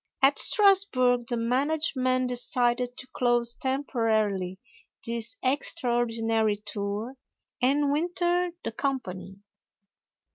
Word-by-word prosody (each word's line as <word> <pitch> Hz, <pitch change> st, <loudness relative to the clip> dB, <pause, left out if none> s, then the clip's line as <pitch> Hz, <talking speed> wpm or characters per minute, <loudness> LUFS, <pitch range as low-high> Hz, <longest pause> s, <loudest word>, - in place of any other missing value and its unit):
At 280 Hz, +1 st, +5 dB
Strasburg 265 Hz, -, +4 dB
the 240 Hz, -, -1 dB
management 255 Hz, 0 st, 0 dB
decided 245 Hz, 0 st, -1 dB
to 260 Hz, -, -7 dB
close 240 Hz, -1 st, +1 dB
temporarily 220 Hz, -8 st, -1 dB, 0.5 s
this 235 Hz, -, -2 dB
extraordinary 235 Hz, -5 st, 0 dB
tour 205 Hz, +3 st, -5 dB, 0.5 s
and 280 Hz, +3 st, +2 dB
winter 350 Hz, +3 st, 0 dB
the -, -, -4 dB
company. 195 Hz, -9 st, -4 dB
245 Hz, 85 wpm, -26 LUFS, 225-280 Hz, 0.5 s, At